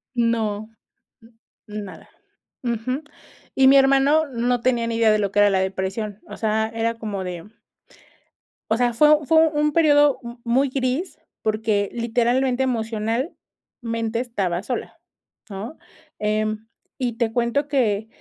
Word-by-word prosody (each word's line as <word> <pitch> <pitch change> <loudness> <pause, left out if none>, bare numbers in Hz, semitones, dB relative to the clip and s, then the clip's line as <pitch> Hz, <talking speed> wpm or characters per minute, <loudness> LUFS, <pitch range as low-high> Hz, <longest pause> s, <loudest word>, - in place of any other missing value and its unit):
No, 220 -3 0 1.0
n 210 0 -6
nada, - - -12 0.5
ujú, 245 +4 -2 0.5
y 265 0 +5
mi 275 - +7
hermano 275 +3 +4
no 245 -2 -1
tenía 240 -2 +1
ni 230 - -2
idea 225 -1 +4
de 215 - +2
lo 200 -2 -1
que 205 - +3
era 205 0 +5
la 195 - +2
depresión, 195 +2 -3
o - - -8
sea, 220 0 0
era 230 0 -1
como 200 -4 -4
de. 180 +3 -7 1.2
O - - +1
sea, 245 -1 +1
fue 300 +3 +4
fue 320 +1 +5
un 300 0 0
periodo 290 -3 +4
m 235 +1 -8
muy 260 +4 +2
gris, 260 +7 -2 0.2
porque 215 -2 0
literalmente 245 +2 +1
emocionalmente 230 0 -3
estaba 195 -7 -2
sola, 245 +3 -5 0.5
¿no?, 205 +10 -7 0.4
em, 215 +1 -1 0.3
y 240 -4 -2
te 225 -2 0
cuento 245 +5 0
que. 220 -7 0
230 Hz, 140 wpm, -22 LUFS, 215-265 Hz, 1.2 s, mi